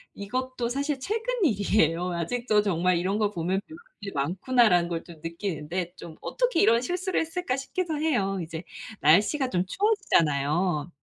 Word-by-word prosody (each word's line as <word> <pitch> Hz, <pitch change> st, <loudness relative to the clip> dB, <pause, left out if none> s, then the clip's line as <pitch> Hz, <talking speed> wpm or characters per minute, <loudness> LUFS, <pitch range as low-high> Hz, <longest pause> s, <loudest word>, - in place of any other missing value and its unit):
이것도 250 Hz, +3 st, -3 dB
사실 280 Hz, +2 st, -1 dB
최근 455 Hz, -, -2 dB
일이에요. 180 Hz, -, +2 dB
아직도 210 Hz, +5 st, +1 dB
정말 180 Hz, -2 st, +2 dB
이런 190 Hz, +4 st, 0 dB
걸 210 Hz, -1 st, +1 dB
보면 180 Hz, +2 st, -1 dB
'배울 320 Hz, +1 st, -11 dB, 0.2 s
일이 200 Hz, -1 st, -5 dB
많구나.'라는 180 Hz, -, +2 dB
걸 165 Hz, -1 st, -3 dB
좀 170 Hz, -, -12 dB
느끼는데. 170 Hz, 0 st, -4 dB
좀 160 Hz, -2 st, -10 dB
'어떻게 -, -, 0 dB
이런 230 Hz, +1 st, +5 dB
실수를 365 Hz, +7 st, -1 dB
했을까?' 325 Hz, -5 st, -2 dB
싶기도 315 Hz, +3 st, -3 dB
해요. 205 Hz, -12 st, 0 dB
이제 160 Hz, 0 st, -6 dB, 0.4 s
날씨가 210 Hz, -, +4 dB
좀 180 Hz, -3 st, 0 dB
추워지잖아요. 165 Hz, -, +1 dB
200 Hz, 355 characters per minute, -26 LUFS, 170-265 Hz, 0.4 s, 이런